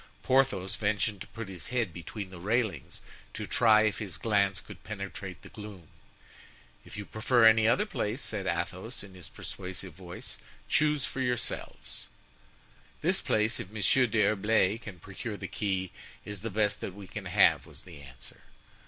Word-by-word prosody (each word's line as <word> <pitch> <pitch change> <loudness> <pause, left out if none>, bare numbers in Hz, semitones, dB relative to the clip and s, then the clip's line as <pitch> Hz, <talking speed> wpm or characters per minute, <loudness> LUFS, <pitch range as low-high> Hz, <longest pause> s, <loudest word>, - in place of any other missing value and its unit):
Porthos 120 -8 +2
ventured 100 -1 0
to - - -6
put 115 -2 -7
his 95 -2 -7
head 115 -8 0
between 95 +4 -6
the 90 - -9
railings, 105 - -1 0.3
to - - -3
try 110 -2 +5
if 110 -1 +1
his 100 -6 -5
glance 100 -4 +2
could - - -11
penetrate - - -6
the - - -11
gloom. 100 -6 -10 0.9
"If - - -10
you 105 - -4
prefer 115 +3 +3
any 110 0 +7
other 195 - +4
place," 115 - -2
said 100 -7 -3
Athos, 90 +8 -2
in 100 -2 -12
his 90 -4 -9
persuasive 95 -1 -7
voice, 90 +1 -9 0.3
"choose 150 -2 +3
for 135 - -3
yourselves." 125 -2 -3 1.0
"This - - +2
place, 110 +2 +1
if 110 -6 -5
Monsieur 115 +5 +4
d'Herblay 110 -1 +3
can 105 -5 -9
procure 100 +4 -6
the - - -5
key, 95 -3 -1 0.3
is 105 -2 -5
the 115 - -3
best 105 0 +1
that 95 - -5
we 100 -1 -9
can - - -7
have," - - +4
was - - -10
the 80 -5 -12
answer. 65 -2 -13
105 Hz, 165 wpm, -30 LUFS, 95-115 Hz, 1.0 s, any